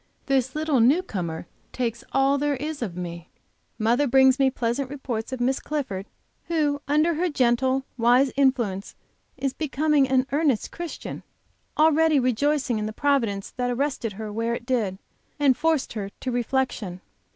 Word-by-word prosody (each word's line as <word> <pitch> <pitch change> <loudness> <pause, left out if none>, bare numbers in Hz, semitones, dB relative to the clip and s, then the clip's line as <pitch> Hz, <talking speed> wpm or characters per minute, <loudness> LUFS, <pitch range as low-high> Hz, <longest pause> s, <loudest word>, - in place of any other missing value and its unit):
This 265 -1 +1
little 305 -3 +1
new 275 +11 +4
comer 170 - -4 0.3
takes 235 -2 -3
all 270 +1 +3
there, 290 0 +1
is 300 +2 -5
of 190 -7 -4
me. 170 -1 -6 0.5
Mother 235 +6 +2
brings 265 +1 +5
me 270 -1 +4
pleasant 255 +1 -2
reports 255 -5 -4
of 260 - -4
Miss 260 +2 +1
Clifford, 240 -10 -4 0.4
who 300 -4 0
under 305 +4 +3
her 350 +3 0
gentle, 260 -1 +1
wise 245 +3 +4
influence 240 -8 +1 0.4
is 270 0 -1
becoming 300 -2 +1
an 260 0 +3
earnest 285 -5 +1
Christian, 345 -2 -6 0.6
already 315 -1 +4
rejoicing 255 0 +1
in 210 - -2
the 215 - -5
Providence 230 -8 0
that 250 -1 0
arrested 250 -3 -1
her 210 +1 -6
where 230 +2 -1
it 235 - -8
did, 225 -7 0 0.4
and 280 -3 +4
forced 320 -2 0
her 200 -3 -4
to 255 - -3
reflection. 240 -7 -1
260 Hz, 155 wpm, -25 LUFS, 230-285 Hz, 0.6 s, brings